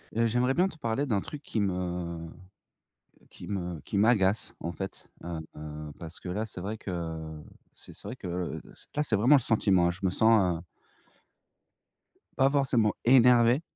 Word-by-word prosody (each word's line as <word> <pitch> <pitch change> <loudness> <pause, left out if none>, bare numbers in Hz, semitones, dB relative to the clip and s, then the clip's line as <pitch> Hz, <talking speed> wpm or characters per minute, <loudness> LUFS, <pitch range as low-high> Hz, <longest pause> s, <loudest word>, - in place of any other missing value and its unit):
Heu, 115 0 +3
j'aimerais 125 +3 +2
bien 180 +2 +4
te 160 - -10
parler 115 +2 -1
d'un 105 -7 0
truc 150 +6 -8
qui 110 - -3
me 90 -3 -2 1.0
qui - - -11
me 90 -5 -3
qui 100 - -4
m'agace, 105 -1 +3
en 85 - -4
fait. 95 +2 -7
Heu, 85 -1 -4 0.2
heu, 75 0 -7
parce 85 0 -9
que 90 - -7
là, 105 +5 -2
c'est 100 -4 -9
vrai 105 +4 -4
que 80 -5 -5 0.3
c'est - - -13
c'est - - -11
vrai - - -5
que 90 -1 -4
c - - -14
là, 150 - +2
c'est 120 -7 0
vraiment 120 +8 +6
le 140 - +4
sentiment. 95 -6 +3
Je 95 +2 -6
me 90 - +2
sens, 95 -5 +3
heu - - -12 1.7
pas 135 0 +5
forcément 130 -7 +2
énervé, 125 +1 +6
100 Hz, 175 wpm, -29 LUFS, 85-120 Hz, 1.7 s, vraiment